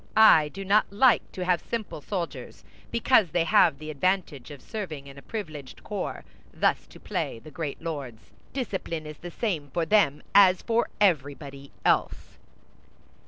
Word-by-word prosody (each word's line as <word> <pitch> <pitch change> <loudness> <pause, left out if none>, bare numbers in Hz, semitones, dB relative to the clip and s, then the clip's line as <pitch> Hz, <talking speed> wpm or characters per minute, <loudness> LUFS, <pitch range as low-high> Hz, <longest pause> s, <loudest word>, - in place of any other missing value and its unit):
I 190 -9 +7
do 195 +5 -8
not 205 +2 +3
like 235 +4 +3
to 185 - -4
have 180 -2 +2
simple 220 -9 -5
soldiers, 180 +1 -5 0.3
because 235 -4 +3
they 170 +2 +1
have 155 -3 +4
the 155 +1 -7
advantage 155 -3 -1
of 145 -2 -10
serving 160 - -6
in 140 -1 -12
a 140 - -11
privileged 155 - -7
corps, - - -5 0.3
thus - - 0
to - - -15
play - - -3
the 155 +7 -13
great 155 0 -5
lords; 140 -9 -6 0.2
discipline 190 - -4
is 150 0 -9
the 175 - -7
same 170 -7 -3
for 170 +3 -1
them 160 -6 +3
as 185 -2 +6
for 230 +1 +1
everybody 140 -6 0 0.2
else." - - 0
165 Hz, 160 wpm, -26 LUFS, 145-200 Hz, 0.3 s, I